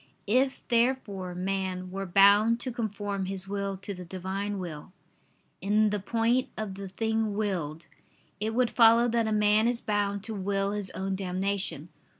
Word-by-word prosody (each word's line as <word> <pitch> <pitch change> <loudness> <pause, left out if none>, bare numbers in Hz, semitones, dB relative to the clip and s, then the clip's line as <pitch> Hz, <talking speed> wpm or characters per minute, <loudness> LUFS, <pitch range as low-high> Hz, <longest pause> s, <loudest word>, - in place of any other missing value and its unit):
If 260 +5 +1
therefore 230 -7 0
man 185 0 -3
were 195 0 -4
bound 205 +5 +5
to 255 - -3
conform 205 -4 -3
his 190 0 -3
will 200 -1 -3
to 200 +2 -6
the 180 -1 -8
Divine 190 +3 -4
will, 175 -1 -7 0.7
in 210 +2 +2
the 210 - -1
point 230 +5 +1
of 215 -3 -4
the 195 0 -7
thing 220 +1 -1
willed, 170 -7 -2 0.5
it 220 +2 -2
would 245 -1 +2
follow 230 0 +6
that 230 -1 +1
a - - -1
man 210 +1 +3
is 240 -1 0
bound 205 -2 -1
to 225 - -4
will 195 0 -1
his 205 -2 -3
own 195 +1 -2
damnation. 190 -3 -1
200 Hz, 160 wpm, -28 LUFS, 190-220 Hz, 0.7 s, follow